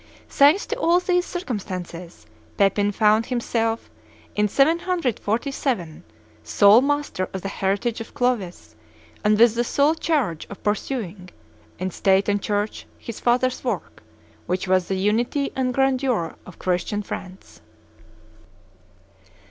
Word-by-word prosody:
Thanks 290 Hz, +8 st, +4 dB
to 460 Hz, -, -3 dB
all 345 Hz, -4 st, +4 dB
these 360 Hz, 0 st, 0 dB
circumstances, 185 Hz, -, -6 dB, 0.3 s
Pepin 200 Hz, +1 st, +2 dB
found 215 Hz, +2 st, +3 dB
himself, 230 Hz, -2 st, -1 dB, 0.4 s
in 210 Hz, 0 st, +2 dB
747, 270 Hz, -, 0 dB, 0.4 s
sole 205 Hz, +3 st, +6 dB
master 290 Hz, -9 st, -1 dB
of 190 Hz, -, -5 dB
the -, -, -2 dB
heritage 200 Hz, +4 st, -1 dB
of 225 Hz, -, -10 dB
Clovis 240 Hz, -8 st, -2 dB, 0.5 s
and 210 Hz, 0 st, +3 dB
with 230 Hz, 0 st, +6 dB
the 235 Hz, +1 st, 0 dB
sole 285 Hz, +5 st, +2 dB
charge 290 Hz, -, -1 dB
of 200 Hz, -, -11 dB
pursuing, 205 Hz, -4 st, -3 dB, 0.5 s
in 185 Hz, +1 st, -3 dB
State 195 Hz, +2 st, +2 dB
and 205 Hz, -1 st, +1 dB
Church, 205 Hz, +1 st, -2 dB
his 230 Hz, -, -8 dB
father's 250 Hz, +1 st, +1 dB
work, -, -, -4 dB, 0.5 s
which 185 Hz, +1 st, -2 dB
was 185 Hz, -1 st, +2 dB
the 190 Hz, -, -1 dB
unity 235 Hz, +8 st, 0 dB
and 255 Hz, -1 st, 0 dB
grandeur 260 Hz, -8 st, +1 dB
of 185 Hz, -, -12 dB
Christian 185 Hz, +3 st, -1 dB
France. 185 Hz, -, -9 dB
215 Hz, 125 wpm, -23 LUFS, 195-265 Hz, 0.5 s, sole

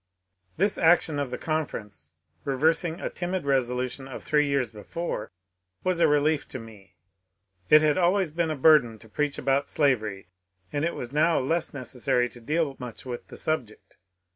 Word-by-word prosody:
This 200 Hz, +4 st, +1 dB
action 165 Hz, -2 st, +4 dB
of 140 Hz, -3 st, -2 dB
the 125 Hz, -, -4 dB
conference, 105 Hz, -, -4 dB, 0.3 s
reversing 160 Hz, +5 st, +1 dB
a -, -, -3 dB
timid 180 Hz, -2 st, -3 dB
resolution 130 Hz, -1 st, -1 dB
of 135 Hz, -, -8 dB
three 150 Hz, -1 st, +2 dB
years 135 Hz, -5 st, 0 dB
before, 110 Hz, +1 st, -5 dB, 0.5 s
was 185 Hz, -2 st, 0 dB
a -, -, +5 dB
relief 150 Hz, +1 st, +2 dB
to -, -, -7 dB
me. 110 Hz, -5 st, -13 dB, 0.7 s
It 150 Hz, 0 st, +7 dB
had 155 Hz, +3 st, +3 dB
always 180 Hz, -1 st, +2 dB
been 165 Hz, +1 st, 0 dB
a 155 Hz, -, -1 dB
burden 135 Hz, -6 st, +5 dB
to 110 Hz, -, -16 dB
preach 145 Hz, +6 st, -1 dB
about 135 Hz, +2 st, +1 dB
slavery, 110 Hz, -10 st, 0 dB, 0.4 s
and 145 Hz, 0 st, -1 dB
it 170 Hz, -, 0 dB
was 120 Hz, +2 st, -6 dB
now 160 Hz, +3 st, +3 dB
less 165 Hz, +6 st, 0 dB
neces 130 Hz, -3 st, -8 dB
sary 125 Hz, +1 st, +2 dB
to 120 Hz, -, -13 dB
deal 150 Hz, +2 st, 0 dB
much 125 Hz, -1 st, -8 dB
with 125 Hz, -2 st, -6 dB
the -, -, -10 dB
subject. 125 Hz, -9 st, -4 dB
140 Hz, 170 wpm, -26 LUFS, 125-160 Hz, 0.7 s, It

